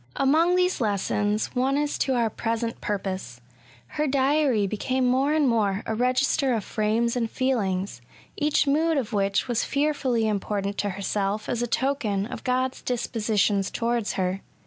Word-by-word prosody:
Among 320 +6 +3
these 365 -4 +1
lessons, 205 0 0
one 265 +3 +1
is 295 0 -1
to 265 - +1
our 230 -2 +1
present 230 +1 -3
purpose. 190 -11 -4 0.5
Her 300 - -2
diary 270 -4 +2
became 255 +6 -1
more 260 +3 +2
and 305 -2 +3
more 210 -4 +1
a 220 - -2
register 255 +2 +1
of 220 - -2
frames 225 +4 0
and 230 -2 -1
feelings, 200 - -1 0.3
each 300 0 +2
mood 315 +3 +2
of 240 -4 -2
which 195 +1 +1
was 240 -2 0
fearfully 275 -6 0
important 200 -1 -2
to 205 - 0
herself 200 +2 -2
as 240 - -1
a 240 - 0
token 235 -6 0
of 250 +1 -7
God's 255 0 -1
dispositions 215 -4 0
towards 235 -2 -1
her. 185 +1 -1
235 Hz, 155 wpm, -25 LUFS, 205-265 Hz, 0.5 s, Among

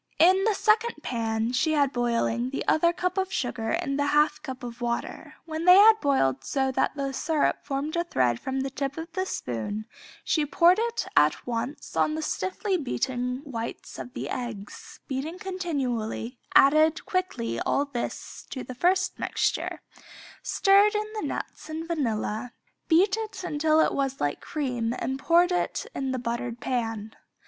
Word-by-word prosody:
In 375 +4 +5
the 440 -2 +2
second 435 -4 +2
pan 225 -1 -1
she 310 +5 +2
had 285 -3 +2
boiling 240 0 0
the 275 - -4
other 340 +2 +4
cup 365 +2 -1
of 380 0 -1
sugar 235 -6 -2
and 275 +4 -1
the 285 - +2
half 295 +1 +3
cup 260 -2 -7
of 240 0 -7
water; 235 0 -3
when 320 +1 -4
they 360 0 +9
had 435 +3 +8
boiled 135 - +2
so 265 - 0
that 260 - 0
the 275 -1 -2
syrup 310 +2 +1
formed 290 +3 -3
a 340 - +1
thread 125 - +1
from 265 0 -2
the 270 0 -3
tip 275 +1 -3
of 325 +1 -6
the 375 +3 -2
spoon 165 - -4 0.4
she 310 - +1
poured 340 +6 +4
it 470 +1 -1
at - - +3
once 245 +4 -4
on 310 - +2
the 315 - -3
stiffly 375 +3 -1
beaten 255 -3 -2
whites 235 -4 -6
of 250 - -8
the - - -4
eggs, 230 -5 -7
beating 285 +5 -3
continually, 265 - -3 0.2
added 310 +3 +5
quickly 365 - -2
all 285 - +1
this 265 -4 -6
to 260 - -5
the 255 - -7
first 370 +7 +1
mixture, - - -1 0.6
stirred 400 +2 +4
in 425 +1 -2
the 430 - -3
nuts - - -6
and 320 +1 -4
vanilla, 240 -6 -2 0.3
beat 370 +5 +4 0.3
until 310 -1 +2
it - - +3
was 270 -1 -1
like 145 0 -1
cream 245 -6 -2
and 265 +3 -3
poured 345 +4 +4 0.4
in 270 -1 -2
buttered 240 -1 -3
pan. 225 -4 -3
275 Hz, 165 wpm, -26 LUFS, 240-340 Hz, 0.6 s, they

